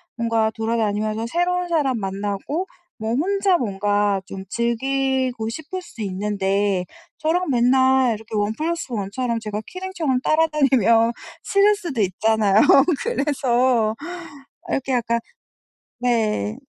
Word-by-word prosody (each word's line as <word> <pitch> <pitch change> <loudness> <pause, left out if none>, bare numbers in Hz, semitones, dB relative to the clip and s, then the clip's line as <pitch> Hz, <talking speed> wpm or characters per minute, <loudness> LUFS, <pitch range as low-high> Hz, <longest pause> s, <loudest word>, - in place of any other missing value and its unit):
뭔가 230 -2 +1
돌아다니면서 220 -1 -1
새로운 355 +4 0
사람 280 -8 +1
만나고 200 - -3 0.3
뭐 220 +1 -3
혼자 385 +5 +2
뭔가 205 -2 0
좀 195 -1 -8
즐기고 255 0 -1
싶을 315 +8 -6
수도 235 -10 -11
있는데, 195 -1 0 0.3
저랑 340 +2 0
맨날 260 0 +3
이렇게 220 +1 -9
1 205 +1 0
플러스 335 -1 -2
1 200 -3 -3
처럼, 240 0 -1
제가 210 -1 -4
키링처럼 345 -9 -2
따라다니면 265 -8 +3 0.3
싫을 410 0 +4
수도 335 - -5
있잖아요. 205 +1 +2 0.5
그래서 255 - +1 0.7
이렇게 270 -1 -1
약간 235 -1 +1 0.8
네. 225 -3 0
235 Hz, 260 characters per minute, -22 LUFS, 215-285 Hz, 0.8 s, 싫을